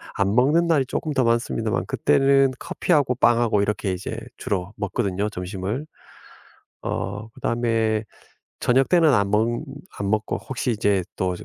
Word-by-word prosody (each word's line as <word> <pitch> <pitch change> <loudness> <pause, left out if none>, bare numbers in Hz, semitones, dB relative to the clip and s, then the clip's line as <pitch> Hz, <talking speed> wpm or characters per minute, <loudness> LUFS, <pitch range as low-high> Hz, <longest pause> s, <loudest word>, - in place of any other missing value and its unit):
안 100 0 +1
먹는 150 +8 +4
날이 150 -5 +3
쪼끔 155 +1 -3
더 130 -2 +2
많습니다만 115 - 0
그때는 135 - +3
커피하고 145 -7 +1
빵하고 120 -3 +3
이렇게 100 -1 -1
이제 90 +1 -5 0.2
주로 95 0 -3
먹거든요 100 -2 -1
점심을. 95 +7 -4 1.0
어 105 +3 -4
그다음에 115 -2 0 0.6
저녁때는 145 +6 +4
안 100 -2 +2
먹 110 +2 +3 0.5
안 100 -1 -2
먹고 110 0 0
혹시 130 -1 -3
이제 100 -3 +1
또 90 -1 -1
이제 - - -10
110 Hz, 305 characters per minute, -23 LUFS, 100-130 Hz, 1.0 s, 먹는